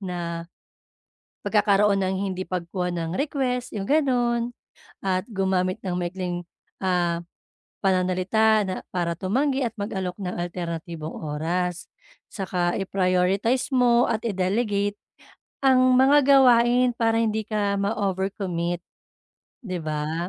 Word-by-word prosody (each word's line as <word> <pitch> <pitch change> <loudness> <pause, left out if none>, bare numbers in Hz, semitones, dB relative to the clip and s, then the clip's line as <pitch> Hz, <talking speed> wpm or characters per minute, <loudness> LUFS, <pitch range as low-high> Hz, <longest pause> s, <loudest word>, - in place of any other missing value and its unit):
na 170 -3 -5 1.0
pagkakaroon 200 -1 +3
ng 190 0 0 0.2
hindi 185 0 -4
pagkuha 180 0 -3
ng 165 -2 -3
request 260 -4 -1
yung 195 -1 -3
ganun, 245 -5 +1 0.5
at 185 -1 0
gumamit 190 -2 0
ng 185 -2 -2
maikling, 175 0 -3 0.4
ah, 175 -2 +1 0.6
pananalita 190 +4 +2
na 185 - -3 0.2
para 175 -2 0
tumanggi 265 +9 0
at 230 - -5
mag-alok 190 -3 -3
ng 185 -2 -4
alternatibong 170 -2 -5
oras. 170 +4 -2 0.5
'Tsaka 180 -3 -1
i-prioritize 190 +5 +1
mo 245 -1 +4
at 220 - -1
i-delegate 205 +1 0 0.7
ang 255 -1 +5
mga 270 +3 +6 0.2
gawain 245 -1 +5
para 225 -1 +1
hindi 220 -1 -1
ka 205 -2 0
ma-overcommit, 190 -4 -2 0.8
'di 185 -4 -3
ba? 155 +3 -2
190 Hz, 110 wpm, -24 LUFS, 180-225 Hz, 1.0 s, mga